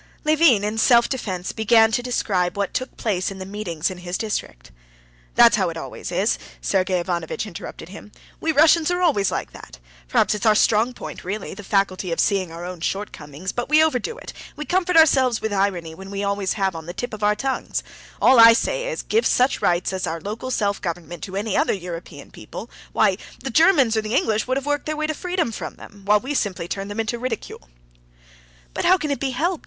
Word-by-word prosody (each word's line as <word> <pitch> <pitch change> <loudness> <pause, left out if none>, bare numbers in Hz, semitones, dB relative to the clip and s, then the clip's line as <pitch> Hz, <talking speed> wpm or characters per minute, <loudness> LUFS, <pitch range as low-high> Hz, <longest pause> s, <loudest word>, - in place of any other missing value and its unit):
Levin 305 -9 +4
in 210 +2 -2
self 235 +1 +5
defense 190 -9 -3
began 225 0 +4
to 240 - +1
describe 200 -7 -1
what 200 -1 -1
took 255 - -4
place 190 -5 -1
in 195 - -8
the 190 - -7
meetings 185 -4 -3
in 185 - -8
his 180 0 -4
district. 210 - -5 0.6
"That's - - +7
how - - +1
it - - -6
always - - -7
is!" - - +1 0.2
Sergey 185 - +1
Ivanovitch 175 +2 -3
interrupted 170 -3 -9
him. 210 +2 -11 0.3
"We 320 - 0
Russians 315 +2 +5
are 355 0 0
always 240 - +3
like - - -3
that. - - -12 0.3
Perhaps - - +2
it's 210 0 -4
our 215 - +5
strong 225 +4 +3
point, - - -8
really, 200 +3 -4
the 205 - -10
faculty 190 -2 0
of 165 - -2
seeing 190 -4 +1
our 170 +1 -7
own 180 -2 -7
shortcomings; 170 -3 -4
but 245 - -4
we 305 +1 +6
overdo 315 - -1
it, - - -9 0.2
we 300 - -6
comfort 360 +3 +1
ourselves 265 -7 +5
with 220 -1 -3
irony 190 -5 -1
which 190 +4 -10
we 200 0 -4
always 200 -1 -1
have 195 -4 -1
on 160 0 -8
the 175 - -7
tip 245 +3 -4
of 215 - -7
our 210 0 +3
tongues. 265 +4 -2 0.4
All 260 -2 +6
I 230 0 +10
say - - -1
is, 480 - -4
give 450 +2 +1
such 255 +2 +2
rights 175 +2 +1
as 185 -1 -2
our 165 +1 -3
local 215 +8 -5
self 205 -5 -1
government 170 -1 -5
to 190 - -8
any 205 0 -2
other - - +2
European 170 -5 -8
people—why, 195 - -2 0.3
the 265 - -3
Germans 290 - +4
or 220 - +2
the 215 +3 -3
English 220 -3 +1
would 255 +1 0
have 275 - -4
worked 290 0 -1
their 310 0 -2
way 310 - -1
to 310 - -1
freedom 355 -4 -2
from - - -6
them, 205 -1 -14
while 210 +1 +4
we 265 +6 -4
simply 190 -9 -2
turn 195 +2 -4
them 205 +2 -6
into 225 +2 -2
ridicule." 225 - -5 1.0
"But - - -3
how 370 - +6
can 300 -5 -3
it 280 - -1
be 275 - -1
helped?" 320 +7 -1
210 Hz, 215 wpm, -22 LUFS, 185-255 Hz, 1.0 s, I